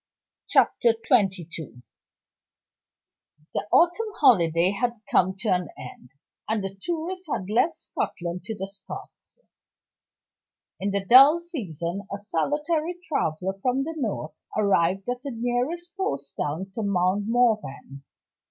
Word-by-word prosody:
Chapter 235 -1 +4
XXII. 215 -5 +2
Retrospect. 150 -8 -9 1.7
The - - -2
autumn 350 +7 +4
holiday 175 - +5
time 200 - -6
had 240 -3 -1
come 185 +1 +3
to 220 - -1
an 180 -3 +1
end; 125 - -10 0.4
and 220 -2 0
the 195 0 -4
tourists 350 - -4
had 185 - -2
left 250 +9 +3
Scotland 175 0 -4
to 220 - -4
the 195 -1 -5
Scots. 200 - -11 1.4
In 200 - -1
the 200 -1 -1
dull 275 - +8
season, 200 - -5
a 200 - -2
solitary 300 - -1
traveler 185 - -1
from 255 +3 +1
the 325 +3 -4
North 210 - -3 0.2
arrived 195 -2 +2
at 245 0 -2
the 280 - -5
nearest 250 +10 -2
post 140 - -3
town 165 +7 -3
to 225 - -3
Mount 200 0 +1
Morven. 215 - 0
205 Hz, 130 wpm, -25 LUFS, 180-270 Hz, 1.7 s, dull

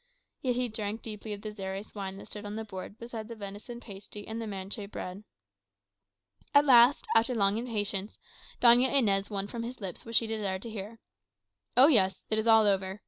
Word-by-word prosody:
Yet 250 -2 0
he 250 0 0
drank 215 0 -4
deeply 215 -1 -7
of 205 -1 -6
the 215 - -5
Xeres 195 0 -6
wine 195 -2 -5
that - - -10
stood 210 - -7
on 205 0 -6
the 220 0 -4
board 195 +1 -8
beside 230 -2 -7
the 230 - -8
venison 205 +3 -8
pasty 205 -1 -10
and 225 +1 -4
the 225 - -4
manchet 200 +1 -5
bread. 185 0 -7 1.3
At 285 +1 +7
last, 250 0 +6
after 230 +2 +3
long 205 +1 +2
patience, 205 -2 -2 0.4
Doña 245 +2 +6
Inez 200 -8 +2
won 200 -2 -2
from 230 +3 -6
his 240 +2 -6
lips 190 -5 -6
what 230 0 -6
she 230 - +4
desired 205 -4 -2
to 230 - -6
hear. 215 +1 -7 0.8
"Oh 255 - +10
yes; 195 -11 +3
all 215 - +3
is 220 - -1
over. 200 -3 +4
215 Hz, 195 wpm, -29 LUFS, 200-230 Hz, 1.3 s, Oh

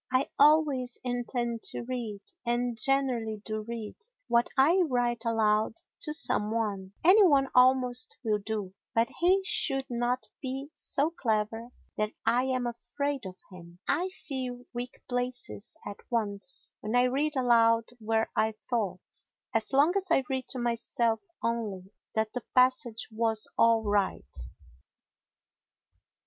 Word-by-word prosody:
I 255 +1 +1
always 285 -4 +4
intend 245 -1 -2
to - - -4
read, 235 -5 -4 0.2
and 240 0 0
generally 235 -3 +1
do 215 0 -3
read, 225 -1 -6 0.3
what 235 0 +3
I 325 +8 +5
write 240 -2 0
aloud 220 -1 +2 0.2
to 300 - -4
some 300 -8 +3
one; 205 -4 -2
any 385 +6 +7
one 280 -7 +4
almost 250 -1 +4
will 215 -3 +1
do, 205 -2 -4 0.2
but 230 +2 +3
he 375 +3 +4
should 270 -8 +1
not 240 0 -1 0.2
be 270 +2 -4
so 295 +4 0
clever 225 -4 -1 0.3
that 215 0 -1
I 240 +3 +3
am 255 -1 0
afraid 265 +1 -3
of 185 - -9 0.2
him. 175 -1 -12
I 340 +7 +1
feel 255 -8 -5
weak 245 +1 -5
places 245 -3 -4
at 205 - -6
once 220 +1 0
when 215 +3 -3
I 245 - +5
read 285 +4 +1
aloud 230 -3 +4
where 225 0 0
I 220 0 +1 0.2
thought, 200 -6 -2 0.3
as 225 +1 0
long 285 +6 +4
as 390 -1 0
I 295 -5 +4
read 260 -1 -2
to - - -2
myself 235 -1 0 0.2
only, 210 -5 -3 0.2
that 220 0 0
the 250 - -3
passage 255 -2 +2
was 220 -1 +2
all 230 -1 +4
right. 200 - -1
240 Hz, 140 wpm, -29 LUFS, 220-265 Hz, 0.3 s, any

